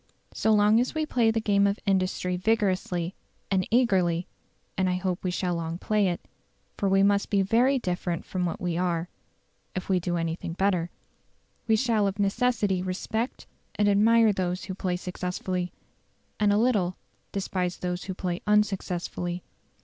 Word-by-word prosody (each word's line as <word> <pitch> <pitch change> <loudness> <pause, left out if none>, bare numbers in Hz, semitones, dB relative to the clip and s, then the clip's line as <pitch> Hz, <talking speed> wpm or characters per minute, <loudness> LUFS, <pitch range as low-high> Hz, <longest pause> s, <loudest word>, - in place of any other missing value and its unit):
So 220 - +1
long 210 +1 +5
as 250 +5 -1
we 310 0 0
play 240 -6 +2
the 225 0 +1
game 200 -2 +3
of 200 +1 0
industry 185 -2 0
vigorously 185 -3 0 0.4
and 190 -2 +1
eagerly 185 -8 +2 0.5
(and 190 -1 +1
I 180 - +1
hope 180 -1 -2
we 185 - 0
shall 180 0 -1
long 165 0 -3
play 210 +1 +1
it, 175 -1 -1 0.6
for 200 - 0
we 195 0 +4
must 200 0 +2
be 200 -2 +3
very 245 +7 +3
different 180 -5 -2
from 185 -1 -2
what 175 - -2
we 175 -3 -1
are 175 -1 -1 0.7
if 185 - -4
we 185 -1 +3
do 175 0 -1
anything 165 0 -3
better), 180 -2 +1 0.8
we 220 - +5
shall 220 -3 +2
of 195 0 -3
necessity 205 -2 +1
respect 210 +6 -3 0.3
and 205 - +2
admire 220 +2 +5
those 180 -1 -2
who 190 - -5
play 185 -1 -2
successfully, 180 0 -3 0.7
and 210 -1 +4
a 205 - +3
little 210 -6 +2 0.3
despise 185 -2 -2
those 180 0 -3
who 190 - -4
play 180 -1 -3
unsuccessfully. 180 -4 0
190 Hz, 165 wpm, -27 LUFS, 180-210 Hz, 0.8 s, long